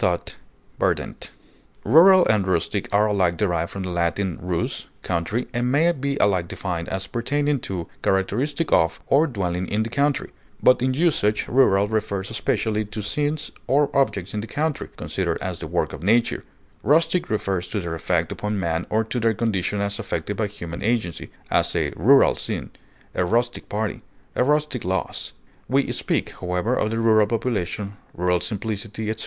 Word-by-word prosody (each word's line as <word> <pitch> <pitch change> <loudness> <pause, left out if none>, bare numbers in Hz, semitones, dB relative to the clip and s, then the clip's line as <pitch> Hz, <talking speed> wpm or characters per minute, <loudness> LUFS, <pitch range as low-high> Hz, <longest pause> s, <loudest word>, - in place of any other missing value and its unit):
clownish, 90 -4 0 0.5
outlandish, - - -1 0.5
Rural 175 - +7
and 105 -3 +2
rustic 85 -3 -1
are 105 +1 +4
alike 95 -5 +1
derived 85 -5 0
from 95 - -5
the 90 - -4
Latin 85 +1 0
rus, 90 -1 -2 0.2
country, 95 +8 -1
and 120 +1 0
may 160 +5 +4
be 140 -3 -2
alike 95 -7 +2
defined 85 -2 -4
as 95 0 -3
pertaining 145 +4 0
to, 90 -6 -5
characteristic 130 - 0
of, 80 0 +3
or 150 +4 +4
dwelling 90 - -2
in 110 +1 0
the 115 - -6
country; 140 +1 0 0.3
but 125 - +6
in 130 0 +1
usage 135 -10 +2
rural 105 -6 +4
refers 105 -2 -2
especially 110 -1 0
to 105 0 -6
scenes 145 +7 -2 0.2
or 145 +2 +2
objects 100 -9 +1
in 105 - -2
the 110 - -7
country, 155 +3 -2
considered - - -2
as - - -4
the - - -5
work - - -1
of - - -7
nature; 115 +6 +2 0.4
rustic 165 - +2
refers 95 -4 -1
to 105 - -2
their 85 -3 -4
effect 85 0 0
upon 105 -1 -2
man 85 -1 -1
or 110 +1 +2
to 115 +3 -3
their 115 -1 +2
condition 100 -2 -1
as 100 +1 -2
affected 100 -2 -3
by 105 +1 0
human 85 -4 -7
agency; 110 -6 -1 0.2
as, - - +2
a - - +1
rural 135 - +6
scene; - - -4 0.4
a - - +1
rustic 120 +6 0
party; 105 0 -2 0.3
a - - +3
rustic 150 -2 +1
lass. 95 +1 -2 0.4
We 135 +2 +2
speak, - - -1
however, 90 +6 0
of 110 - +1
the 115 - -2
rural 110 -2 +4
population, 105 -3 -2 0.2
rural 90 0 +2
simplicity, 110 +1 -4
etc. 110 - -5
105 Hz, 170 wpm, -23 LUFS, 95-125 Hz, 0.5 s, Rural